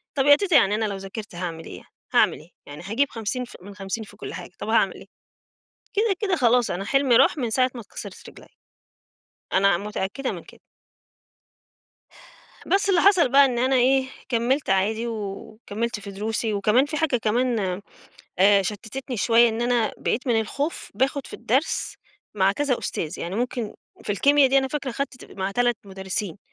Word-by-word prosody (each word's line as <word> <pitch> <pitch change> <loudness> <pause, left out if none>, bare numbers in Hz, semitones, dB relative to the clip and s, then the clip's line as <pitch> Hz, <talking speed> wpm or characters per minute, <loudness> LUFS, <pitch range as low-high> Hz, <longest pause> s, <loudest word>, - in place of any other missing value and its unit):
طب 270 -2 +1
يا 290 0 +8
تيتة 375 -1 0
يعني 205 -6 +5
أنا 220 0 0
لو 200 -2 -3
ذاكرت 195 +1 -8
هاعمل 170 -2 -5
إيه، - - -8
يعني - - -15 0.3
هاعمل - - +4
إيه؟ 155 - -17 0.2
يعني 145 +3 -10
هاجيب 230 +9 0
50 230 +3 -3
ف 240 - -14
من 200 +2 -11
50 195 +3 -4
في - - -14
كُلّ - - -7
حاجة، - - -8
طب - - -5
هاعمل - - +3
إيه؟ - - -12 0.9
كده، 420 -1 +2
كده 385 -4 +1
خلاص 245 -3 +3
أنا 195 +3 -3
حلمي 275 -3 +3
راح - - +5
من 245 -5 -1
ساعة 255 +3 +2
ما 240 - -6
اتكسرِت 210 - -10
رِجليّا. - - -15 1.1
أنا 195 -1 +4
متأكدة 210 +6 -3
من - - -7
كده. - - -17 2.1
بس 400 +1 +1
اللي 360 -3 +4
حصل 370 -8 +5
بقى 280 0 +7
إن 245 -3 -1
أنا 260 +2 +2
إيه 260 +1 +3 0.2
كَمَّلت 255 +4 0
عادي، 215 +5 +1
و 230 - -3 0.4
وكَمَّلت 225 +1 -4
في 200 -1 -8
دروسي، 220 +2 -2
وكمان 210 +6 +3
في 310 +1 -4
حاجة 305 -4 +1
كمان 220 -4 0 0.6
آآ 200 +1 +5
شتِّتني 220 +6 -5
شوية، 235 +2 +5
إن 225 +1 -2
أنا 240 -2 +1
بقيت 250 - -2
من 230 -3 +3
الخوف، 280 +8 -4
باخد 265 +4 0
في - - -9
الدَّرس 250 +7 -1 0.4
مع 195 -1 +3
كذا 275 +1 0
أُستاذ، 160 +2 -4
يعني 175 +2 -4
ممكن 240 -1 -3 0.3
في - - -2
الكيميا 280 +7 +4
دي 270 +1 +4
أنا 265 0 0
فاكرة 280 -1 -3
خدت 265 0 -5
مع 190 0 -3
3 240 +2 +1
مُدرِّسين، 190 0 -4
235 Hz, 185 wpm, -24 LUFS, 200-270 Hz, 2.1 s, يا